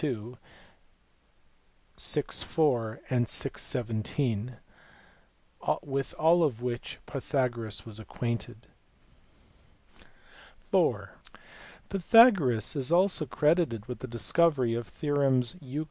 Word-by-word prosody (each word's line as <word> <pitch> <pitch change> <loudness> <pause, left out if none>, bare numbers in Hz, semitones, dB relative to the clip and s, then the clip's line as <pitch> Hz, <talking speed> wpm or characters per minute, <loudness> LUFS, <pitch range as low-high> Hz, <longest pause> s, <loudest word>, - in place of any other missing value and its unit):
2, 125 -5 -4 1.6
vi. - - +1
4, 120 -8 0
and 120 -2 +1
vi. - - 0
17, 115 0 -2 1.3
with 135 -1 -4
all 170 +2 +4
of 130 -8 0
which 120 0 -4
Pythagoras 125 -6 -2
was 110 -1 -6
acquainted. 115 0 -5 2.1
(iv) - - +2 0.8
Pythagoras 190 - +4
is 135 0 -1
also 180 -3 +3
credited 150 - +1
with 125 +1 -7
the 130 - -7
discovery 130 +1 +2
of 120 0 -3
the - - -21
theorems 135 -4 +1
Euc. 140 +1 -5
125 Hz, 95 wpm, -28 LUFS, 115-150 Hz, 2.1 s, all